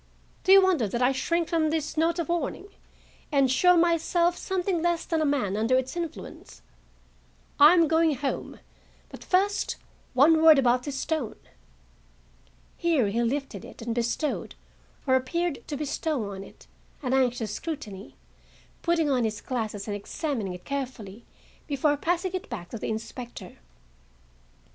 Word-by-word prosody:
Do 380 - +3
you 390 0 +9
wonder 345 - +2
that 235 +5 -1
I 250 - +4
shrink 335 +5 0
from 325 -3 +1
this 310 -1 -2
note 330 +2 +1
of 340 -4 -2
warning, 345 +3 -2 0.6
and 275 -3 +3
show 360 +7 +5
myself 340 +1 +2
something 365 -2 -1
less 345 0 0
than 325 -2 0
a - - +2
man 255 -9 0
under 225 +4 +2
its 260 +3 -2
influence? 335 -2 -7 1.0
I 300 +5 +9
am 335 -2 +4
going 320 -1 +3
home; 275 +1 -4 0.5
but, - - -11
first, 395 +2 +1 0.4
one 315 +5 +5
word 320 -2 +8
about 250 -2 +3
this 280 +1 -5
stone." 315 +2 -2 1.4
Here 315 - +2
he 230 +4 0
lifted 245 -4 -2
it - - -11
and 230 0 -2
bestowed, 240 +6 -2 0.5
or 260 - +2
appeared 300 +5 0
to 290 - -4
bestow 285 -6 -2
on 195 0 -7
it, - - -16 0.4
an 255 -1 -1
anxious 245 -5 +1
scrutiny, 220 - -6 0.7
putting 335 -3 +1
on 260 -4 +2
his 215 -2 -2
glasses 215 -5 -4
and 205 - -2
examining 215 - -3
it 180 - -13
carefully 245 -6 -5 0.4
before 290 +1 +1
passing 350 +5 -1
it 370 - -4
back 185 -8 -6
to 230 - -6
the - - -4
inspector. 225 +2 -7
285 Hz, 155 wpm, -27 LUFS, 240-335 Hz, 1.4 s, you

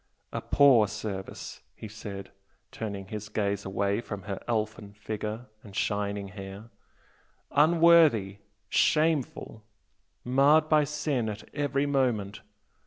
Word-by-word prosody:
"A - - -2
poor 130 -7 +5
service!" 100 -2 -6
he 110 - -8
said, 100 -2 -8 0.4
turning 100 -3 -5
his 105 0 -6
gaze 100 -1 -1
away 100 +2 0
from 105 -4 -7
her 100 -1 -5
elfin 110 -3 -2
figure 105 +2 -5 0.2
and 100 -3 -12
shining 100 -1 -1
hair 100 +3 -9 0.8
"Unworthy, 155 - +5 0.3
shameful! 150 -8 +1 0.6
marred 140 +5 +4
by 155 -1 +4
sin 145 -5 -1
at 105 0 -7
every 145 -1 0
moment! 120 -8 0
110 Hz, 110 wpm, -28 LUFS, 100-140 Hz, 0.8 s, poor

